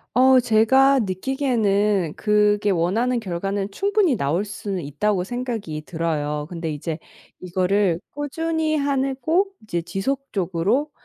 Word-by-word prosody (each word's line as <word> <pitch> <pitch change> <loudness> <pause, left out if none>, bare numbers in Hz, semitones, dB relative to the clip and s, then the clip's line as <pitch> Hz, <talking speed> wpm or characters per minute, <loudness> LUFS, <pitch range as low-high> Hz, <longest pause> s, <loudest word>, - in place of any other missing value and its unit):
어 260 0 +6
제가 255 +4 +4
느끼기에는 205 - 0
그게 210 -1 +2
원하는 215 +8 +1
결과는 195 +1 -3
충분히 395 - +2
나올 170 +3 0
수는 200 -3 -5
있다고 180 +7 0
생각이 225 -8 -4
들어요. 150 -3 -2
근데 165 -2 -4
이제 155 +2 -4 0.4
이거를 185 0 +1
꾸준히 315 +2 -1
해내고 280 +5 +1 0.2
이제 175 -5 -2
지속적으로 195 - -1
210 Hz, 280 characters per minute, -22 LUFS, 180-265 Hz, 0.4 s, 어